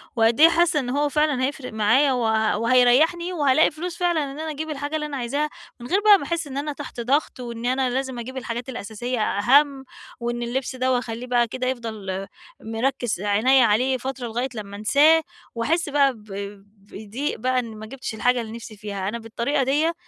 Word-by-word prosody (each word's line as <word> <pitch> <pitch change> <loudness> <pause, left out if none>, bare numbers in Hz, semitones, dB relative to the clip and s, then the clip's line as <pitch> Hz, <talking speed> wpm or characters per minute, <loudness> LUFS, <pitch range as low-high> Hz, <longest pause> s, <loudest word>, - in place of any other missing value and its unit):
وقد 225 +2 +3
إيه 325 +2 +9
حاسّة 340 -2 +3
إن 245 -3 -3
هو 290 +3 +1
فعلًا 300 -3 +1
هيفرق 270 -4 -5
معايّا، 230 +7 +3
وه 220 -4 +1
وهيريحني 255 +10 +3
وهالاقي 295 -2 +3
فلوس 340 +2 -6
فعلًا 345 -3 +1
إن 280 +1 -7
أنا 315 0 -3
أجيب 310 +2 -5
الحاجة 290 +1 -4
اللي 300 -1 -2
أنا 290 -2 -5
عايزاها، 280 +5 -1 0.3
من 240 - -8
غير 375 +7 +2
بقى 420 -1 +7
ما 360 - -7
أحس 330 +1 -2
إن 270 - -6
أنا 295 +1 -2
تحت 280 -3 -8
ضغط، 270 +4 0
وإن 235 -1 -6
أنا 255 +1 +1
لازم 260 -1 -3
أجيب 260 +3 -7
الحاجات 240 0 -5
الأساسية 240 +2 -4
أهَم، 265 +7 +3 0.3
وإن 240 0 -3
اللبس 260 +2 -3
دوّة 255 0 +1
وأخليه 245 0 -4
بقى 240 -1 +2
كده 255 +2 -3
يفضل 215 -6 -4 0.3
مركِّز 225 -2 -2
عنيّا 230 +6 +4
عليه 250 +5 +2
فترة 260 0 -5
لغاية 240 +4 -2
لمّا 200 -2 -7
أنساه، 290 +10 +5 0.3
وأحس 310 +8 0
بقى 280 -2 +3
ب 215 -3 -17 0.7
بضِيق 220 +8 -4
بقى 255 +2 +1
إن 230 -3 -6
ما 215 - -8
جِبتش 250 0 -6
الحاجة 245 +2 +2
اللي 220 -1 -7
نفسي 225 -1 -9
فيها. 200 -2 -4
أنا 235 +2 -4
بالطريقة 235 +5 -1
ديّة 295 +6 +1
255 Hz, 195 wpm, -23 LUFS, 230-290 Hz, 0.7 s, إيه